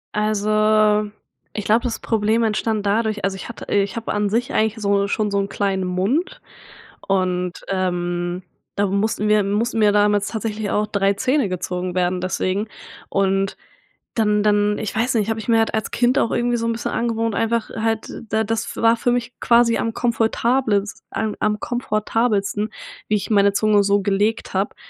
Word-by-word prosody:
Also, 215 0 +2 0.4
ich 210 - -4
glaube 225 +2 +3
das 245 -3 -2
Problem 220 +1 +1
entstand 215 -1 0
dadurch 215 +1 0
also, 195 -1 0
ich 190 - -8
hatte 235 - -8
ich 200 +1 +1
habe 230 - -3
an 205 -1 0
sich 235 +4 -1
eigentlich 220 0 +1
so 200 -1 +1
schon 210 0 -1
so 200 - +1
'n 195 - -2
kleinen 195 -2 -1
Mund 255 - -1 0.7
und, 180 -2 0 0.2
ähm, 175 -1 -2 0.3
da 205 - +2
mussten 205 +2 0
mir 210 -1 +4
mussten 220 +4 -1
mir 210 -1 +5
damals 205 0 +2
tatsächlich 215 -2 -3
auch 210 0 +1
3 200 -2 +1
Zähne 255 +2 +1
gezogen 180 0 -3
werden 180 0 0
deswegen 185 +3 -1 0.4
und 195 0 0 0.6
dann 210 -2 +2
dann 210 0 +2
ich 215 - -4
weiß 235 +4 0
nicht, 220 -1 +1
habe 225 0 -2
ich 220 - -9
mir 230 - +4
halt 225 - 0
als 220 - -1
Kind 245 +2 +2
auch - - +1
irgendwie 240 0 +1
so 230 - -2
'n 230 - +1
bisschen 230 - -4
angewohnt, 230 -2 -1
einfach 225 0 0
halt 225 0 -2 0.2
da 220 +1 +1
das 225 +1 -3
war 230 0 +4
für 245 - 0
mich 245 0 -2
quasi 235 -1 +4
am 225 -1 -2
komfortables 230 -2 0
a 220 -1 -2
am 210 0 +1
komfortabelsten, 215 -3 -1 0.4
wie 215 - +1
ich 205 - -4
meine 200 -1 +4
Zunge 210 0 +3
so 200 0 +2
gelegt 205 +3 0
habe 195 +2 0
210 Hz, 180 wpm, -21 LUFS, 200-225 Hz, 0.7 s, mir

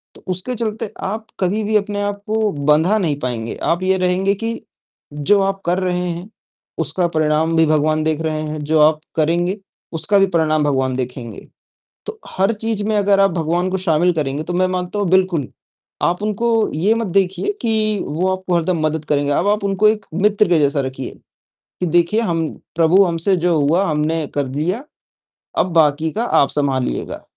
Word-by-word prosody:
तो - - -15
उसके 185 +8 -3
चलते 220 -2 -3
आप 215 +3 -3
कभी 200 +4 0
भी 215 +1 -1
अपने 205 0 -2
आप 205 0 -3
को 215 -1 +1
बँधा 150 +8 +2
नहीं 160 -8 0
पाएँगे। 120 -4 -3
आप 170 +2 0
ये 190 0 +2
रहेंगे 185 +2 +1
कि 225 +3 -3 0.6
जो 150 +8 +2
आप 195 0 -1
कर 180 +2 +1
रहे 180 -1 -1
हैं 175 +4 -6 0.5
उसका 180 -2 0
परिणाम 155 +1 +1
भी 160 - +5
भगवान 155 0 +1
देख 160 0 -1
रहे 155 -1 -2
हैं, 155 0 -4
जो 155 +1 +1
आप 155 0 +4 0.2
करेंगे 170 +5 +1 0.4
उसका 165 +6 +1
भी 195 - +4
परिणाम 155 -2 +2
भगवान 130 -3 0
देखेंगे। 125 -2 -6 0.6
तो 440 0 -7
हर 195 +4 +1
चीज़ 220 -1 -3
में 215 - +1
अगर 200 -1 +3
आप 195 - +4
भगवान 170 +2 0
को 190 - 0
शामिल 175 -1 +2
करेंगे 145 -1 -2
तो 175 - -5
मैं 185 +1 +2
मानता 185 +2 -3
हूँ 200 - 0
बिल्कुल 185 -7 +2 0.6
आप 180 +4 +1
उनको 215 +2 -1 0.3
ये 195 +8 +2
मत 230 -2 -2
देखिए 190 - -1
कि 215 -3 0
वो 165 +6 -1
आपको 185 -1 -2
हरदम 170 0 0
मदद 155 0 -2
करेंगे। 145 -1 0
अब 170 +7 +1
आप 210 0 +1
उनको 200 +2 +2
एक 215 -1 -2 0.2
मित्र 210 0 +3
के 170 -3 +4
जैसा 140 0 +2
रखिए 130 -1 -5 0.7
कि - - +1
देखिए 175 +7 +2
हम 165 -6 0 0.3
प्रभु 170 +4 +5
हमसे 170 +2 +1
जो 175 0 +1
हुआ 160 +7 +2
हमने 155 +1 0
कर 145 -2 0
लिया, 175 - -2 0.8
अब 185 - +1
बाकी 155 0 +3
का 230 +3 -1
आप 140 - +3
सँभालिएगा। 135 - -1
175 Hz, 185 wpm, -19 LUFS, 155-200 Hz, 0.8 s, भी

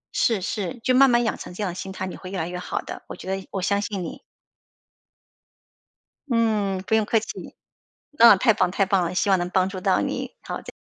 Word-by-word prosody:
是 220 -5 +2
是， 200 +3 -3
就 255 - +2
慢 270 +1 +6
慢 240 0 +3
养 220 - 0
成 - - -8
这 210 - -3
样 185 - -1
的 - - -8
心 190 +1 -6
态， 190 0 -4
你 185 - -6
会 185 - -9
越 195 - -5
来 165 -1 -2
越 180 0 -5
好 - - -3
的。 - - -8
我 - - -7
觉 - - -11
得 190 - 0
你 195 - -8
我 190 - -3
相 200 +1 +1
信 200 -3 -3
你。 165 - -7 2.1
嗯， 210 -5 +1
不 220 - +3
用 220 -1 +2
客 225 - +2
气。 220 - -8 0.6
那 235 -7 +8
太 225 +2 +4
棒 185 -4 +1
太 195 0 +1
棒 190 -1 +2
了， 170 +1 -2
希 195 +2 +1
望 190 - +5
能 175 0 -2
帮 185 0 +2
助 190 -1 -6
到 - - +2
你。 - - -3
好， - - -5
再 - - -10
195 Hz, 260 characters per minute, -24 LUFS, 185-220 Hz, 2.1 s, 那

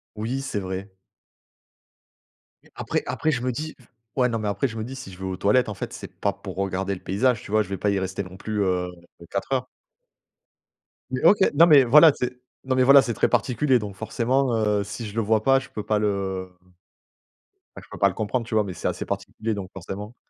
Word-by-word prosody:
Oui, 115 +5 -3
c'est 135 - -3
vrai 95 0 -5 1.7
mais, - - -23
après - - -2
après, 155 - 0
je 125 -5 -1
me 130 - 0
dis 155 +5 -5
v 125 - -21 0.3
ouais 125 - +4
non, 115 - -1
mais 105 -1 -2
après, 100 +7 0
je 115 - -9
me 110 - -3
dis: 130 - -7
«Si 130 -7 -9
je 90 - -13
vais 95 - -7
aux 95 -1 -3
toilettes, 105 +6 +3
en 105 - -4
fait, - - -6
c'est - - -9
pas - - +1
pour - - -9
regarder 95 0 -1
le 90 - -10
paysage, 110 +5 +1
tu - - -11
vois? 110 0 +3
Je 100 - -10
vais 95 -1 -4
pas 105 - +1
y 100 - +1
rester 95 +1 -3
non 90 -1 -11
plus, 105 +1 -2
heu, 90 -1 0 0.4
4 100 +6 -3
heures». 130 -1 0 1.4
Mais, 130 0 -3
OK 205 - +7 0.2
non, 165 +3 +7
mais 145 -5 +7
voilà, 150 +5 +8
c'est 125 0 -2 0.3
non, 130 -1 0
mais 130 - +4
voilà, 140 +1 +8
c'est 120 - -2
très - - +2
particulier 125 +3 +2
donc 100 -2 -7
forcément, 125 +4 0
heu, 105 -2 +1
si 105 +3 -6
je 105 - -8
le 115 - +2
vois 110 0 +2
pas, 135 +2 +4
je 135 +1 -8
peux 105 - -6
pas 105 -1 +1
le, 95 -3 -2
mmh, 90 - -31 1.1
bah, - - -9
je - - -21
peux - - -9
pas 100 - +4
le 95 - -5
comprendre 110 +3 -2
tu 115 - -5
vois, 110 - +4
mais 95 - -5
c'est - - -6
assez - - -3
particulier 110 0 -4
donc 95 -2 -6
forcément. 100 +4 -7
110 Hz, 240 wpm, -24 LUFS, 100-130 Hz, 1.7 s, voilà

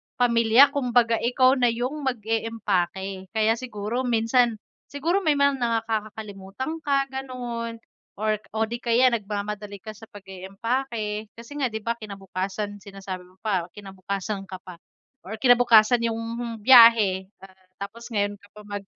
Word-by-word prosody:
pamilya 235 +2 +5
kumbaga 245 -4 +2
ikaw 255 +2 +3
na 245 - +4
yung 250 +6 -3
mag-eempake, 200 -5 -2
kaya 220 +1 +2
siguro 235 -1 -4
minsan, 235 0 +2 0.3
siguro 330 +7 0
may 310 -4 +2
mga 280 -1 +2 0.3
nakakalimutan 215 +5 -5
ka 275 -2 +1
ganon 245 -3 -5 0.4
or 215 0 0 0.2
o 220 - +2
di 235 +2 -5
kaya 245 +2 +4
nagmamadali 205 -1 -4
ka 215 - -6
sa 220 +1 -14
pag-eempake, 210 +3 -4
kasi 230 +2 -12
nga 265 - +3
di 220 - -4
ba 230 - 0
kinabukasan 200 0 -5
sinasabi 195 -2 -8
mo 185 - -24
pa, 190 -5 0
kinabukasan 195 0 -5
ka 185 - -6
pa 180 -2 -11 0.5
or 220 - -5
kinabukasan 240 -1 +5
yung 225 -1 -2 0.5
biyahe, 230 -7 +7 0.5
tapos 225 +4 -8
ngayon 205 0 0
ka 205 - -19
pa - - -10
mag 205 -1 -6
220 Hz, 135 wpm, -25 LUFS, 200-245 Hz, 0.5 s, biyahe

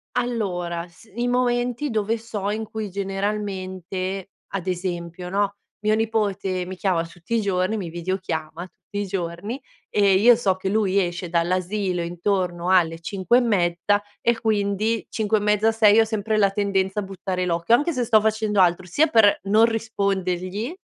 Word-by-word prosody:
Allora, 180 -8 -2
s 175 +6 -20
i 240 +1 -1
momenti 245 +2 0
dove 220 +1 0
so, 215 -3 -4
in 220 +1 -2
cui 220 -1 -4
generalmente 195 -1 -3 0.2
ad 190 -3 -3
esempio, 180 -1 -4
no, 200 +1 0 0.3
mio 215 0 +3
nipote 205 -4 -1
mi 185 +1 -6
chiama 180 -3 0
tutti 175 +7 -5
i 225 - +2
giorni, 195 +1 0
mi 185 -5 -4
videochiama 170 -2 -4
tutti 205 +2 -7
i - - -4
giorni 190 +6 -4 0.3
e 200 -2 +3
io 230 +5 +7
so 200 -5 +1
che 185 +1 -5
lui 200 -2 +1
esce 175 -1 -2
dall'asilo 180 +2 0
intorno 175 0 -1
alle 165 -3 +3
5 190 +6 +1
e - - +4
mezza, 205 -2 +1 0.2
e 235 -1 +1
quindi 215 +1 0
5 220 0 +1
e - - -2
mezza, 210 +1 +3
6 220 -1 +5
ho 225 - +5
sempre 220 0 -1
la 200 -2 +4
tendenza 195 0 0
a - - -5
buttare 190 -1 -3
l'occhio, 170 +6 +3
anche 295 +7 0
se 250 -3 0
sto 225 -2 +5
facendo 215 -1 0
altro. 180 0 +3
Sia 290 - +3
per 220 -6 +5
non 210 +3 +5
rispondergli, 200 - -2
200 Hz, 165 wpm, -23 LUFS, 180-220 Hz, 0.3 s, io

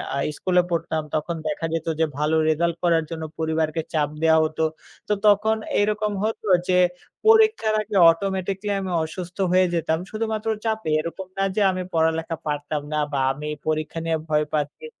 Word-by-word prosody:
আ - - -1 0.2
স্কুলে 180 -1 +3
পড়তাম 160 -2 -1
তখন 155 +2 -1
দেখা 155 +2 -2
যেত 165 -1 -2
যে 160 - +4
ভালো 150 +2 +1
result 170 +2 +1
করার 165 -2 +3
জন্য 160 -1 -5 0.2
পরিবারকে 160 0 0
চাপ 150 -2 +1
দেওয়া 160 0 +5
হতো। 155 0 -2 0.4
তো 210 - +2
তখন 210 +2 +4 0.2
এইরকম 210 +1 +1
হতো 220 0 -2 0.2
যে 180 - +3 0.5
পরীক্ষার 440 - +5
আগে 210 0 -6
automatically 190 +3 -1
আমি 190 -1 -4
অসুস্থ 175 +2 -7
হয়ে 185 0 +5
যেতাম 160 -1 0
শুধুমাত্র 220 0 -3 0.2
চাপে। 220 -6 -1
এরকম 170 +4 -5
না 195 - +1
যে 215 - +1
আমি 185 0 -3
পড়ালেখা 160 0 +1
পারতাম 145 0 -2
না, - - 0 0.2
বা 140 - +1
আমি 150 +2 -7 0.2
পরীক্ষা 155 +1 -1
নিয়ে 165 -1 +1
ভয় 150 -1 +2
পাচ্ছি 150 - -2
165 Hz, 170 wpm, -23 LUFS, 155-200 Hz, 0.5 s, দেওয়া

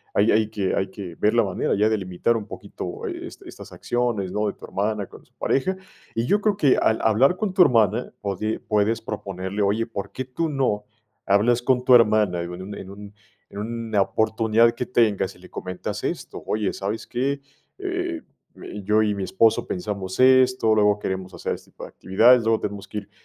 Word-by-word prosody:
Ahí 105 +2 +4
hay 110 0 +2
que 100 -3 -2
hay 95 0 -1
que 95 -3 -8
ver 105 +6 +1
la 115 - +5
manera 95 -2 -1
ya 105 +2 +3
de 110 - +1
limitar 95 +5 0
un 110 -2 -4
poquito, - - -7
eh, - - -5 0.2
estas - - -11
acciones, 120 -6 -2
¿no? 105 0 0
De - - -2
tu - - -12
hermana, 105 0 -2
con - - -15
su - - -31
pareja". 185 +8 0 0.4
Y 115 - 0
yo 205 +10 +2
creo 205 -2 +1
que 140 -8 +4
al 110 - +2
hablar 130 - +4
con 210 -4 -2
tu 185 - +4
hermana, 115 - +3
pode 105 +2 -2
puedes 105 +1 +1
proponerle. 100 -1 -5
Oye, 105 +3 +1
¿por 100 -4 -6
qué 130 - -5
tú 155 +6 -2
no 125 -7 0 0.4
hablas 115 +5 +3
con 125 0 +1
tu 130 - +6
hermana? 105 -6 +4
en 85 - -5
un 100 +2 -7
en 95 - -9
un 100 +1 -11 0.4
en 100 - -8
una 115 -1 -1
oportunidad 110 +3 +2
que 125 - -4
tengas 105 -6 +1
y - - -19
le 90 - -14
comentas 90 -1 -5
esto: - - -4
"Oye, 105 -2 -1
¿sabes 100 +3 -4
qué? 135 +3 -1 0.4
Eh, 365 -4 -3 0.3
y 105 -2 -8
yo 105 +2 +3
y 105 -1 +1
mi 100 - -3
esposo 110 +4 +2
pensamos 95 +1 -4
esto, 130 -3 +5
luego 105 -1 +3
queremos 95 -1 -4
hacer 85 - -3
este - - -16
tipo - - -9
de - - -11
actividades, 115 +5 +4
luego 110 0 +2
tenemos 100 -1 -5
que 105 - -4
ir 100 0 -16
110 Hz, 205 wpm, -23 LUFS, 100-120 Hz, 0.4 s, tu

